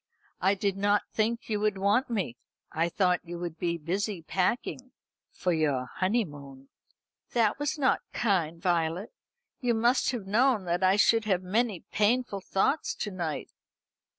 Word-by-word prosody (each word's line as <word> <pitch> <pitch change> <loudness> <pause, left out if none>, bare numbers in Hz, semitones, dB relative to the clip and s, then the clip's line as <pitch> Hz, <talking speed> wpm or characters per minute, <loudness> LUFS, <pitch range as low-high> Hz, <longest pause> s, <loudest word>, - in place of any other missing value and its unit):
"I 190 +3 +3
did 195 0 -1
not 205 +1 +2
think 230 +2 0
you 210 -2 -1
would 210 -1 +1
want 205 +8 +2
me. 195 - -2 0.4
I 165 +2 0
thought 180 0 +2
you 175 0 -7
would 170 -2 -6
be 170 -1 0
busy 185 +3 -2
packing 240 +8 -1 0.4
for 180 - -1
your 145 -5 +1
honeymoon." 145 - -2 0.6
"That 230 0 +2
was 290 +1 -1
not 270 -3 +2
kind, 170 -7 0
Violet. 170 +2 0 0.5
You 245 -2 +1
must 240 +3 +3
have 240 -6 -3
known 220 0 +2
that 175 +1 0
I 185 +1 +5
should 225 +2 +4
have 190 -3 +1
many 210 0 0
painful 215 -1 +1
thoughts 195 +11 0
to 210 - -4
night." 170 -5 -4
195 Hz, 150 wpm, -28 LUFS, 170-225 Hz, 0.6 s, I